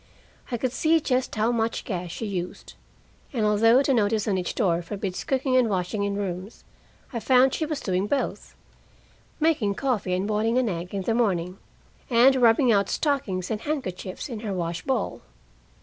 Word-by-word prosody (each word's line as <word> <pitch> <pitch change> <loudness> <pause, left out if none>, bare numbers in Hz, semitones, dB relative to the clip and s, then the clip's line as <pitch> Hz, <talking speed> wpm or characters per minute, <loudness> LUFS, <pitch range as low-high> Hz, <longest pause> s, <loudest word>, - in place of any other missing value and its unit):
I 240 - 0
could 255 +1 -1
see 315 +5 +3
just 255 -4 -1
how 220 +2 +2
much 230 -1 -1
gas 180 -3 -4
she 225 - -5
used; 180 -3 -5 0.6
and 225 -4 0
although 225 +5 +5
the 275 - +2
notice 215 -2 +1
on 200 - +1
each 180 -2 -2
door 175 -7 +1
forbids 190 +1 -4
cooking 265 -1 0
and 250 -3 +4
washing 190 +2 -1
in 200 0 -1
rooms, 195 +1 -5 0.5
I 235 - -2
found 255 +3 +4
she 315 - -1
was 305 -2 -3
doing 190 +1 0
both: 275 +3 -2 0.8
making 290 -11 +2
coffee 220 -8 -1
and 190 +2 -1
boiling 220 +3 +1
an 255 -3 +2
egg 180 +1 -5
in 195 - -2
the 225 - 0
morning, 185 -6 0 0.5
and 250 +2 +6
rubbing 240 +1 +5
out 200 -2 +2
stockings 215 - -1
and 215 -1 -2
handkerchiefs 195 -11 -4
in 235 -6 -6
her 210 -3 -4
wash 170 -1 -3
bowl. 265 -1 -2
215 Hz, 180 wpm, -25 LUFS, 190-255 Hz, 0.8 s, and